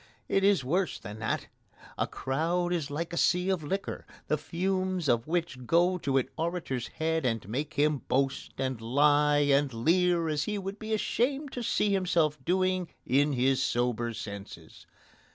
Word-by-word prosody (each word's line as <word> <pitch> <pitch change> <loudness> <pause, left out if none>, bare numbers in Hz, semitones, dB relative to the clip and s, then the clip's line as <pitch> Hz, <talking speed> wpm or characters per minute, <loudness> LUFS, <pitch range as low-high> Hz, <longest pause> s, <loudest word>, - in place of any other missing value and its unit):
It 195 - +1
is 195 -7 +4
worse 175 +7 0
than 105 -1 -9
that. 110 - -1 0.5
A - - -1
crowd 170 +6 -1
is 160 -5 -2
like 165 +4 -4
a - - -3
sea 180 +2 +2
of 180 -5 -1
liquor, 195 +7 -4 0.2
the 155 - +2
fumes 185 +1 -1
of 120 0 +2
which 160 -7 -2
go 175 +2 +3
to 135 -4 0
an 130 - +1
orator's 160 -8 -2
head 160 0 -1
and 115 -5 -1
make 145 +8 -3
him 150 0 +2
boast 135 +1 0
and 130 -3 -2
lie 145 +4 +3
and 140 0 +3
leer 170 +7 +2
as 150 -1 0
he 210 - -2
would 195 +1 -5
be 220 0 -6
ashamed 270 +6 -1
to 245 - -4
see 210 -3 +1
himself 165 -7 +1
doing 185 +1 +1 0.2
in 140 +3 +3
his 130 +1 +2
sober 120 -3 0
senses. 100 -6 -9
155 Hz, 170 wpm, -29 LUFS, 130-180 Hz, 0.5 s, is